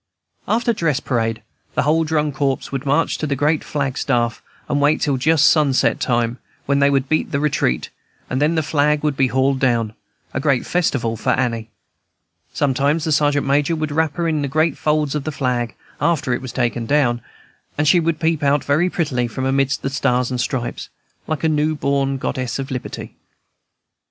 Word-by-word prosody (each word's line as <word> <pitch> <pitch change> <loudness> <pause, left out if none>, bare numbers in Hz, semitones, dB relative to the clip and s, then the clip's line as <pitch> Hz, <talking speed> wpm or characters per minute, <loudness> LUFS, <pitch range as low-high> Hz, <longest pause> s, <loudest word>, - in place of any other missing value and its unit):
After 235 +1 +1
dress 165 - 0
parade 115 -3 -1 0.3
the - - +2
whole 155 +3 +3
drum 150 -1 0
corps 135 -1 -1
would 135 +1 -4
march 145 +4 +1
to 155 - -2
the 140 - 0
great 150 +3 +1
flag 135 -3 -2
staff, 120 -4 0 0.3
and 145 0 0
wait 145 +2 +3
till 145 -3 +1
just 155 +3 +3
sunset 145 -4 +3
time, 120 -1 0 0.3
when 140 0 +2
they 140 0 +4
would 135 -1 +1
beat 155 - 0
"the 140 - 0
retreat," 135 - 0 0.4
and 130 +2 -2
then 155 +3 +2
the 160 - +1
flag 150 0 +1
would 150 -2 +1
be 135 -1 +3
hauled 130 +1 +1
down, 115 -4 +1 0.4
a - - -1
great 135 -2 +1
festival 135 -10 0
for 110 - -3
Annie. 115 -3 0 0.8
Sometimes 145 +3 +1
the 160 - -1
Sergeant 145 -1 +2
Major 145 +4 +2
would 155 -1 -3
wrap 155 -1 0
her 170 -1 -1
in 155 -2 0
the 140 - -1
great 155 +2 +1
folds 150 -2 0
of 150 -2 -2
the 155 - -3
flag, 125 -5 -2 0.3
after 150 -6 +1
it - - -2
was 130 -2 -6
taken 120 -2 -1
down, 120 -4 +2 0.6
and 150 +1 +1
she 175 - +6
would 165 -1 0
peep 160 -2 +1
out 145 0 +2
very 155 +6 +2
prettily 130 -9 -1
from 130 +3 -4
amidst 135 +1 +1
the - - 0
stars 125 -3 +1
and 125 -1 -1
stripes, 120 0 -3 0.4
like 155 0 -3
a - - +4
new 155 0 +1
born 140 -1 0
Goddess 130 -2 -3
of 135 +1 -5
Liberty. 125 -1 -6
140 Hz, 195 wpm, -20 LUFS, 130-150 Hz, 0.8 s, she